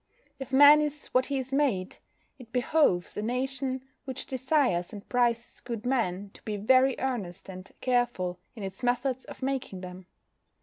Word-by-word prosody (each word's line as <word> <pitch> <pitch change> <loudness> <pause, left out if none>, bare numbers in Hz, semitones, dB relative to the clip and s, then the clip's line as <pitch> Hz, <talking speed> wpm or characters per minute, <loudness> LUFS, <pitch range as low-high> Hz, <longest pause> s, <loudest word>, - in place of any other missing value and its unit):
If 270 -1 -7
man 290 +2 +8
is 295 -1 -2
what 255 0 +3
he 280 - -1
is 265 0 -4
made, 245 -11 +1 0.4
it 235 -3 -13
behoves 250 - +2
a - - -1
nation 260 +3 -2 0.2
which 260 -2 -4
desires 260 - +1
and 205 0 -10
prizes 240 -1 0
good 235 -2 -6
men 205 -6 -1
to - - -16
be 210 -1 -4
very 255 +5 +4
earnest 230 -10 -3
and 185 0 -9
careful 240 -8 0 0.2
in 215 - -7
its 190 +4 -6
methods 250 +1 0
of - - -10
making 260 -8 -2
them. 180 0 -9
245 Hz, 165 wpm, -28 LUFS, 200-265 Hz, 0.4 s, man